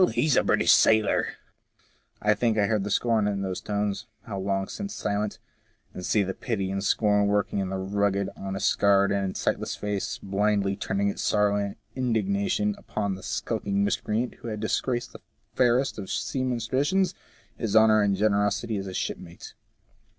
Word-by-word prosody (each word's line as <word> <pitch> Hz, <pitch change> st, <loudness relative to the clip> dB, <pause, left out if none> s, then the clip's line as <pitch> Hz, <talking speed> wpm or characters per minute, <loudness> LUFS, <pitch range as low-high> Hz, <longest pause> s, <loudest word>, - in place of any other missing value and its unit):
He 150 Hz, -4 st, +2 dB
a -, -, +4 dB
British -, -, +3 dB
sailor! 110 Hz, -2 st, +4 dB, 0.4 s
" -, -, -38 dB
I 105 Hz, 0 st, +4 dB
think 110 Hz, +1 st, 0 dB
I 105 Hz, -, +3 dB
hear 110 Hz, +1 st, +1 dB
the 100 Hz, +1 st, -3 dB
scorn 110 Hz, 0 st, +2 dB
in 100 Hz, -1 st, -1 dB
those 95 Hz, -1 st, -3 dB
tones, 105 Hz, -1 st, -2 dB, 0.2 s
how 100 Hz, -3 st, -5 dB
long 95 Hz, 0 st, -1 dB
since 200 Hz, 0 st, -6 dB
silent! 105 Hz, 0 st, -2 dB, 0.6 s
and 90 Hz, -, -7 dB
see 105 Hz, +2 st, +2 dB
the 95 Hz, 0 st, -3 dB
pity 100 Hz, -6 st, -3 dB
and 100 Hz, 0 st, -2 dB
scorn 105 Hz, -1 st, +3 dB
working 105 Hz, 0 st, 0 dB
in 95 Hz, -1 st, -2 dB
the 95 Hz, -, -3 dB
rugged, 100 Hz, +1 st, 0 dB
honest, 95 Hz, +1 st, -2 dB
scarred, 100 Hz, -1 st, +3 dB
and 100 Hz, -2 st, -1 dB
sightless -, -, -1 dB
face, 105 Hz, -1 st, -3 dB
blindly 100 Hz, 0 st, +1 dB
turning 100 Hz, 0 st, -1 dB
its -, -, -4 dB
sorrow 105 Hz, -1 st, +2 dB
and 100 Hz, -1 st, -2 dB, 0.2 s
indignation 105 Hz, -4 st, 0 dB
upon 100 Hz, -2 st, -3 dB
the 95 Hz, -, -8 dB
skulking 105 Hz, -1 st, -1 dB
miscreant 110 Hz, +3 st, -1 dB
who -, -, -8 dB
had 110 Hz, -2 st, -4 dB
disgraced 120 Hz, +3 st, -1 dB
the -, -, -11 dB, 0.3 s
fairest 125 Hz, 0 st, +2 dB
of 100 Hz, -, -5 dB
the -, -, -8 dB
seaman's 125 Hz, -4 st, -1 dB
traditions, 170 Hz, +10 st, +1 dB, 0.4 s
his 110 Hz, -3 st, -2 dB
honour 110 Hz, -1 st, +6 dB
and 100 Hz, -1 st, +2 dB
gene 105 Hz, +2 st, +3 dB
rosity 105 Hz, +2 st, 0 dB
as 95 Hz, -, -5 dB
a 95 Hz, -, -6 dB
shipmate. 85 Hz, 0 st, -5 dB
105 Hz, 180 wpm, -26 LUFS, 100-110 Hz, 0.6 s, honour